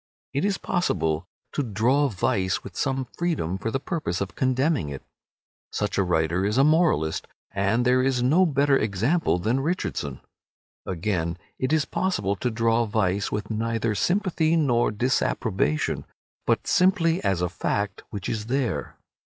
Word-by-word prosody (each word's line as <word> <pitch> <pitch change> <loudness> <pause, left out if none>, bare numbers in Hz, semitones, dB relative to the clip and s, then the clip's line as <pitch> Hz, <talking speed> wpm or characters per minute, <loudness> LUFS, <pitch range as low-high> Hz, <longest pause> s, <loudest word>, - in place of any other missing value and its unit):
It 140 - 0
is 200 0 +1
possible 85 - -1 0.3
to - - 0
draw 125 +5 +2
vice 95 -4 0
with 95 - -10
some 135 -1 -1
freedom 145 - -1
for 110 - -2
the 135 - -1
purpose 145 - -2
of 100 -1 -3
condemning 130 - +1
it. 70 -2 -7 0.7
Such 105 -1 -1
a - - +4
writer 85 0 +1
is 105 +4 0
a 135 - +6
moralist, 150 - +2 0.2
and 100 +5 +1
there 125 +1 +4
is 130 -2 +1
no 165 +9 +4
better 140 -1 +3
example 115 - +1
than 110 +9 0
Richardson. 135 - -2 0.7
Again, 85 -2 -1 0.2
it 130 +2 0
is 155 -2 +3
possible 170 - -1
to 125 - -1
draw 115 0 +2
vice 100 -2 0
with 105 +1 -3
neither 115 0 -1
sympathy 175 - +1
nor 125 -7 +3
disapprobation, 105 - 0 0.4
but - - +2
simply 180 -3 +3
as 95 -4 +1
a 90 - +1
fact 100 +1 -2
which 100 -3 -5
is 110 -1 -3
there. 130 -1 -2
115 Hz, 150 wpm, -25 LUFS, 95-145 Hz, 0.7 s, a